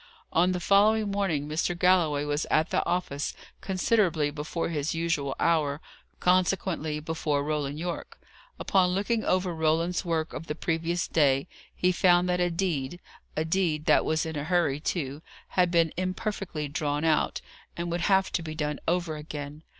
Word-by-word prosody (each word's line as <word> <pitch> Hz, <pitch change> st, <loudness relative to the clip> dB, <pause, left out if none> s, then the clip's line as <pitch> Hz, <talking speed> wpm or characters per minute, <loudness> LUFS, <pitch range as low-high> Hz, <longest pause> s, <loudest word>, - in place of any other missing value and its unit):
On 180 Hz, +3 st, +4 dB
the 180 Hz, -, -1 dB
following 205 Hz, +3 st, +3 dB
morning 180 Hz, -8 st, 0 dB
Mr. 165 Hz, +3 st, -1 dB
Galloway 170 Hz, -5 st, +3 dB
was 145 Hz, +1 st, -1 dB
at 160 Hz, +2 st, +2 dB
the -, -, +2 dB
office 170 Hz, -5 st, -2 dB, 0.3 s
considerably 185 Hz, -6 st, +1 dB
before 155 Hz, +3 st, -3 dB
his 155 Hz, -1 st, -2 dB
usual 165 Hz, -5 st, -1 dB
hour; 150 Hz, -4 st, +2 dB, 0.4 s
consequently, 180 Hz, -4 st, +1 dB
before 150 Hz, -2 st, -1 dB
Roland 145 Hz, -1 st, -2 dB
Yorke. 170 Hz, +1 st, -5 dB, 0.4 s
Upon 180 Hz, -2 st, +2 dB
looking 220 Hz, +3 st, 0 dB
over 185 Hz, -1 st, +1 dB
Roland's 165 Hz, +3 st, +1 dB
work 165 Hz, -3 st, -1 dB
of 165 Hz, -, -6 dB
the 150 Hz, -, -3 dB
previous 165 Hz, +2 st, -1 dB
day, 140 Hz, -4 st, +2 dB, 0.3 s
he 180 Hz, -, +2 dB
found 180 Hz, 0 st, +4 dB
that 180 Hz, 0 st, +1 dB
a 175 Hz, 0 st, +2 dB
deed 170 Hz, -3 st, -2 dB, 0.4 s
a 155 Hz, -, +1 dB
deed 160 Hz, -3 st, 0 dB
that -, -, +5 dB
was 155 Hz, 0 st, 0 dB
in 160 Hz, -1 st, -4 dB
a 145 Hz, 0 st, -3 dB
hurry, 160 Hz, -5 st, +1 dB
too 150 Hz, -3 st, -3 dB, 0.3 s
had 180 Hz, -1 st, +2 dB
been 165 Hz, -2 st, +2 dB
imperfectly 185 Hz, -4 st, -3 dB
drawn 145 Hz, 0 st, -2 dB
out, 160 Hz, -2 st, +2 dB, 0.4 s
and 170 Hz, 0 st, -3 dB
would 170 Hz, 0 st, -1 dB
have 190 Hz, +1 st, +3 dB
to 175 Hz, -, 0 dB
be 155 Hz, -1 st, -6 dB
done 150 Hz, -2 st, -2 dB
over 170 Hz, -2 st, 0 dB
again. 150 Hz, 0 st, -7 dB
165 Hz, 165 wpm, -27 LUFS, 150-180 Hz, 0.4 s, that